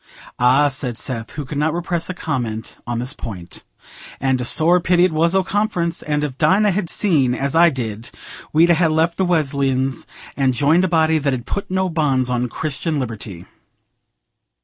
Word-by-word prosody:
'" - - -21
"Ah," 130 +4 +4
said 130 -4 -3
Seth, 115 -3 -4
who 145 -1 -5
could 140 +2 -4
not 155 +2 0
repress 175 -1 -3
a 185 - -4
comment 115 - -4
on 120 -1 -2
this 125 +2 -2
point, 90 -7 -8 0.6
"and 130 -1 0
a - - -3
sore 165 +7 +3
pity 180 0 +3
it 185 - 0
was 165 +3 +1
o' 190 - +3
Conference; 185 -4 -1
and 150 -1 -1
if 140 -3 -4
Dinah 205 +2 +3
had 185 -2 -2
seen 145 - +1
as 140 +2 -2
I 170 +1 +6
did, 115 -5 -5 0.4
we'd 165 +3 +4
ha' 165 -1 +3
left 160 +2 +1
the 190 - +1
Wesleyans 135 -5 0 0.3
and 135 -2 +1
joined 155 +8 +3
a - - +1
body 160 -2 +2
that 140 -2 0
'ud 120 -1 -7
put 200 - -4
no 190 0 0
bonds 140 -7 0
on 125 0 -1
Christian 155 +3 -3
liberty." 110 -8 -6
150 Hz, 190 wpm, -20 LUFS, 130-170 Hz, 0.6 s, I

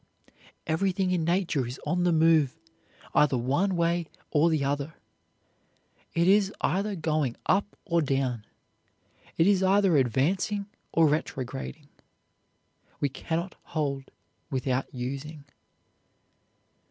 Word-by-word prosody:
Everything 185 +3 0
in 175 -3 +1
nature 170 -4 +1
is 125 +2 -7
on 180 0 +1
the 175 - +4
move, 160 -3 +4 0.6
either 140 -3 +4
one 145 +11 +1
way 170 0 +1 0.2
or 155 +3 +4
the 155 -3 +1
other. 145 +3 -2 1.2
It 170 +1 +3
is 200 0 +4
either 200 +3 0
going 155 -6 0
up 200 +2 +1
or 170 -4 +2
down. 135 -5 -1 0.9
It 165 - +4
is 195 -1 +4
either 190 -3 +4
advancing 170 - +1 0.3
or 165 - +4
retrograding; 145 0 -3 1.1
we 145 - +1
cannot 170 +6 -3
hold 140 -4 -3 0.4
without 130 -1 -1
using. 140 +4 -5
160 Hz, 110 wpm, -27 LUFS, 140-180 Hz, 1.2 s, the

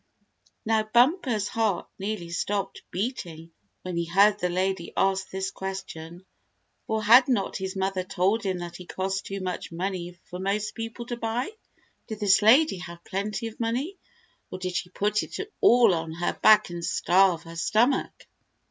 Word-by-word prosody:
Now 220 0 +3
Bumper's 240 - +2
heart 215 -6 -1
nearly 195 -4 -4
stopped 195 +3 -2
beating 175 -6 -4 0.3
when 180 -2 -4
he 170 - 0
heard 200 +4 +4
the 180 - 0
lady 185 0 -1
ask 190 -1 +1
this 190 0 -3
question, 185 -2 -7 0.6
for 220 0 -1
had 240 +4 +7
not 225 -7 0
his 190 0 -4
mother 190 -1 -1
told 195 +4 +1
him 190 -2 -2
that 175 -1 -7
he 180 - -11
cost 190 +1 -3
too 195 0 -5
much 180 -2 -4
money 180 0 -4
for 180 - -7
most 205 +2 -1
people 225 +1 -6
to 240 0 -5
buy? 235 - -2 0.6
Did 220 -3 -6
this 200 -2 +4
lady 245 +3 +5
have 170 -1 -9
plenty 210 +4 -3
of 225 -1 -7
money, 255 +11 -2 0.5
or - - -6
did 185 -1 -4
she 180 - -2
put 210 +3 0
it - - -7 0.2
all 235 -5 +6
on 165 -1 -3
her 175 +1 -1
back 215 -4 +5
and 170 0 -6
starve 180 -1 +3
her 165 0 -10
stomach? 225 +10 +1
195 Hz, 165 wpm, -26 LUFS, 180-220 Hz, 0.6 s, had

